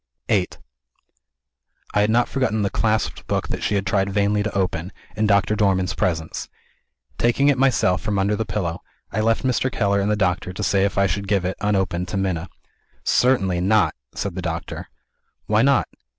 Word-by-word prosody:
VIII 95 -4 +3 1.5
I 105 - +3
had 105 - +2
not 120 +2 +3
forgotten 110 -6 0
the 100 - 0
clasped 110 -2 -1
book - - -1
that - - -3
she 105 - 0
had 100 -1 0
tried 100 -1 +1
vainly 100 +1 +1
to 105 -1 -2
open, 90 -1 -1 0.2
in 110 0 +1
Doctor 100 +1 +3
Dormann's 95 -3 +1
presence. 80 -3 -2 0.7
Taking 130 +4 +3
it 140 - +3
myself 120 -9 +3
from 105 -2 -1
under 100 +2 +1
the 110 - -1
pillow, 95 -4 -3 0.3
I 110 - -2
left 115 +1 +1
Mr. 130 0 +1
Keller 100 -3 +1
and 100 - 0
the 105 - +2
doctor 90 -2 0
to - - -4
say 100 -1 +2
if 100 - -2
I 100 - +4
should 100 +2 -2
give 95 -2 +1
it, 95 - -1
unopened, 95 -3 0
to 95 - -3
Minna. 90 -3 -2 0.5
"Certainly 95 -9 +2
not!" 105 +3 +3 0.2
said 100 -2 -3
the 95 - -4
doctor. 85 -1 -5 0.6
"Why 105 +1 +3
not?" 140 0 +3
100 Hz, 185 wpm, -22 LUFS, 95-110 Hz, 1.5 s, I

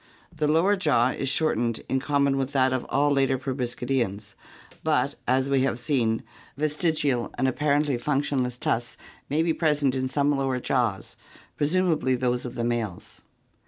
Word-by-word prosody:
The 150 - 0
lower 165 +7 +3
jaw 145 -10 +2
is 135 +1 -2
shortened 120 -7 0
in 135 - 0
common 140 0 +1
with 135 0 -2
that 130 -1 +3
of 130 - -2
all 145 +1 +2
later 135 -1 +2
proboscid 125 -2 -3
eans, 105 -5 -1 0.5
but - - +1
as 130 +1 +2
we 135 -1 +2
have 130 -3 0
seen, 120 -4 0 0.3
vestigial 150 -4 0
and 130 - +1
apparently 145 0 +1
functionless 135 -2 -1
tusks 120 -1 -2 0.3
may 155 +3 +1
be 165 -1 +1
present 150 -5 +1
in 130 -1 -1
some 145 +2 +1
lower 135 -2 -1
jaws, 120 -6 -1 0.4
presumably 155 -4 +1
those 125 0 -1
of 120 - -7
males. 115 -6 -3
135 Hz, 155 wpm, -25 LUFS, 125-145 Hz, 0.5 s, lower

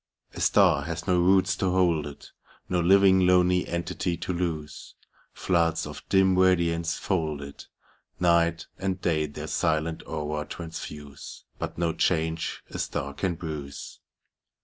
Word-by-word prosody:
A - - -7
star - - +4
has 80 0 -4
do 90 -1 +2
roots 95 +1 +3
to 95 - 0
hold 85 -5 +2
it, 70 - -12 0.4
No 90 - 0
living 95 +1 +5
lonely 90 0 +3
entity 85 0 -2
to 90 - -3
lose. 85 -4 -4 0.4
Floods 85 -2 0
of 75 0 -8
dim 95 -1 +4
radiance 85 -2 +2
fold 80 -7 -1
it; 70 0 -10 0.5
Night 85 -1 +2
and 95 -1 -2
day 80 -4 0
their 75 - -7
silent 80 0 -1
aura 75 -1 -3
transfuse, 75 -4 -8 0.2
But - - -5
no 85 -1 0
change 80 -1 -1
a - - -6
star 70 0 -3
oan 85 +4 -2
bruise. 75 -4 -7
85 Hz, 140 wpm, -26 LUFS, 80-90 Hz, 0.5 s, living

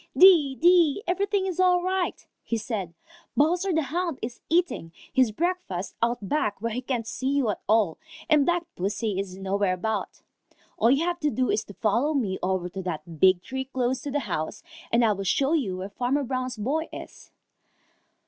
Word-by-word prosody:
"Dee, 330 -8 +7
dee, 345 +2 +4
everything 395 +2 0
is 370 -2 -3
all 360 -1 +4
right," 370 -1 -1 0.3
said 215 -4 -3
he. 170 - -25 0.4
"Bowser 355 +6 +2
the 320 -2 +2
Hound 335 0 -2
is 235 +1 -5
eating; 335 - +1 0.2
his 255 -4 +4
breakfast 320 - -2
out 230 -3 0
back 210 -8 0
where 230 +2 -2
he 245 +3 -3
can't 245 -3 -2
see 260 +3 -3
you 275 -6 +2
at - - -7
all, 215 -6 +3 0.3
and 305 -3 +5
Black 345 0 +2
Pussy 200 +2 -2
is 190 -1 -5
nowhere 195 0 0
about. 215 +3 -3 0.5
All 230 - +3
you 275 +6 +3
have 350 0 -1
to 300 -3 +1
do 255 -2 0
is 220 - 0
to 200 - -12
follow 240 +8 +1
me 200 -9 -1
over 185 -1 0
to 190 +2 -6
that 165 -3 -6
big 185 0 +5
tree 265 0 -4
close 260 -1 -1
to 285 - -5
the 290 +1 -1
house, 155 - -4 0.3
and 235 0 +4
I 220 - +4
will 195 0 -5
show 270 - +2
you 220 - 0
where 190 +2 -5
Farmer 250 +7 0
Brown's 255 -1 -3
boy 290 +10 -1
is." - - -10
255 Hz, 190 wpm, -26 LUFS, 200-320 Hz, 0.5 s, Dee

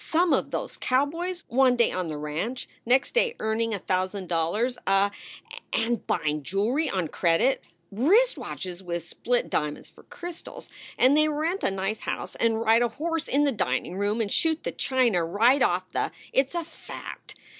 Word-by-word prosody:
some 340 +1 +2
of - - +1
those - - -4
cowboys 330 +7 0
one 255 0 +4
day 235 -1 +3
on 180 -2 -2
the 155 -2 -4
ranch, 155 +12 -4 0.2
next 255 +2 +3
day 485 -1 +2
earning 220 +1 0
a 210 - -1
thousand 185 +1 -2
dollars 175 +9 0
a 195 +1 +3 0.6
and 230 -1 0
buying 150 0 0
jewelry 220 - 0
on 185 -6 -1
credit 170 - +2 0.3
wrist 380 - +4
watches 180 -1 -6
with 170 -2 -4
split 245 +8 0
dia - - +3
monds - - -11
for - - -17
crystals 350 +8 -8 0.3
and 260 +3 +5
they 305 0 +5
rent 320 +6 -1
a - - +3
nice 195 +2 -2
house - - -4
and 225 -1 +2
ride 225 +1 +4
a 240 - +4
horse 325 +7 -3
in 285 +2 +2
the 285 - +3
dining 170 - -1
room 205 +3 0
and 205 -3 -2
shoot 320 -1 +1
the - - -2
china 240 -9 +1
right 225 +11 +3
off - - +2
the - - -1 0.2
It 265 0 +3
s 345 - -14
a 340 - -1
fact! 330 - -10
230 Hz, 185 wpm, -26 LUFS, 190-290 Hz, 0.6 s, and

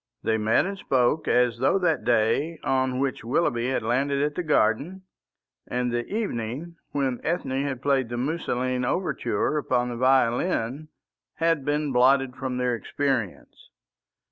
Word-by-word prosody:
They 110 0 +1
met 110 +8 +2
and 195 0 -5
spoke 130 +1 +1
as 120 -1 +2
though 135 +9 +3
that 175 -4 +1
day 120 +8 +1
on 130 -1 +1
which 135 0 -2
Willoughby 120 -1 0
had 130 - -1
landed 135 +5 0
at 150 0 0
the 180 - -2
garden, 155 - +1 0.6
and 125 0 -1
the 120 0 -2
evening 170 - -3
when 135 -4 -1
Ethne 140 -5 -1
had 140 -2 -4
played 135 -4 +1
the 120 - -4
Musoline 130 -3 -1
Overture 150 +1 -1
upon 125 -3 0
the 120 - -5
violin, 130 +2 +1 0.5
had 165 -2 +1
been 145 0 0
blotted 130 +1 +3
from 130 -1 -4
their 125 -1 0
experience. 120 -3 -3
130 Hz, 145 wpm, -25 LUFS, 120-150 Hz, 0.6 s, though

